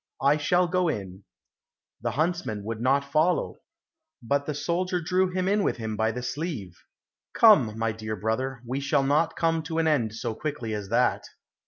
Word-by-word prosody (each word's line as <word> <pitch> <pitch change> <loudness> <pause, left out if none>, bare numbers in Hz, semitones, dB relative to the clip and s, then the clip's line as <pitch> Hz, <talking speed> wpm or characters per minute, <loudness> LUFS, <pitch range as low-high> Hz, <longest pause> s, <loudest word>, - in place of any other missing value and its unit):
I 140 +2 +4
shall 175 +4 +2
go 180 0 +1
in." 95 - -4 0.8
The - - -1
huntsman 160 - -1
would 110 +1 -5
not 135 +3 +2
follow, 160 +4 +1 0.6
but 140 +4 0
the 150 - -2
soldier 180 +4 -1
drew 185 +2 +1
him 185 0 -1
in 205 +2 +2
with - - 0
him 110 -2 -4
by 110 +1 +1
the 125 +2 -5
sleeve. 125 - -4 0.6
"Come, 135 - +6
my 115 0 0
dear 110 0 -5
brother, 120 +5 -2
we 130 +3 -2
shall 140 0 +1
not 155 +4 +2
come 165 -1 +1
to 160 +1 -5
an 165 -1 +2
end 120 -8 +1
so 115 - -3
quickly 125 -3 -4
as 105 -2 -5
that!" - - +1
140 Hz, 180 wpm, -26 LUFS, 110-165 Hz, 0.8 s, Come